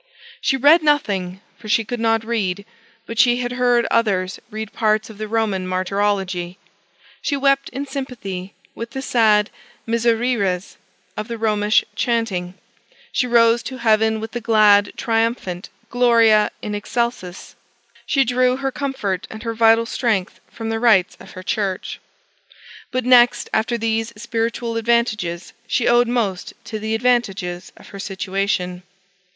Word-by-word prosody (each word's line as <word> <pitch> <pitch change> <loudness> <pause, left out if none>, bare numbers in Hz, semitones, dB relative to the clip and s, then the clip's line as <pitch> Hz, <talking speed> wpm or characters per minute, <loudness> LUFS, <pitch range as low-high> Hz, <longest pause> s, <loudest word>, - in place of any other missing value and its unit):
She 270 -3 +1
read 295 +6 +6
nothing, 200 -12 0 0.2
for 215 - -10
she 225 +1 +2
could 245 +2 -4
not 225 0 +1
read; 200 -4 -2 0.4
but 230 0 -6
she 245 -1 +5
had 245 0 -3
heard 245 -1 +2
others 195 -5 +1
read 220 -1 -6
parts 215 -1 0
of 210 - -15
the 215 - -4
Roman 210 -4 -1
martyrology. 185 -1 -1 0.6
She 285 - -1
wept 275 0 +2
in 275 +2 -5
sympathy 235 -9 -6 0.2
with 230 +2 -7
the 265 - -4
sad 215 -5 +3 0.4
Misereres 230 -5 0 0.4
of 215 - -5
the 235 -1 -5
Romish 215 -1 +2
chaunting; 195 -7 -1 0.6
she 250 - 0
rose 235 -1 +4
to 260 +1 -7
heaven 220 -1 +2
with 220 +1 -6
the 240 - -5
glad 210 -3 +4
triumphant 225 -5 -1 0.2
Gloria 230 -3 +4
in 210 - -4
Excelcis: 205 -3 -3 0.5
she 275 - +3
drew 250 +1 +2
her 270 0 -2
comfort 250 -10 -3
and 220 +1 -9
her 230 -1 -3
vital 225 0 +4
strength 220 -5 -1
from 225 -1 -6
the 225 0 -1
rites 215 -6 +3
of - - -13
her 185 - -9
church. 195 -1 -3 0.9
But, 255 -1 -2
next 245 -1 +5
after 230 +2 +1
these 225 0 -1
spiritual 230 0 -2
advantages, 220 -7 -1
she 235 - 0
owed 240 0 +4
most 220 -7 -2
to 220 - -6
the 220 +1 -2
advantages 205 -7 -1
of - - -15
her 200 - -10
situation. 190 -2 -2
225 Hz, 145 wpm, -20 LUFS, 200-240 Hz, 0.9 s, read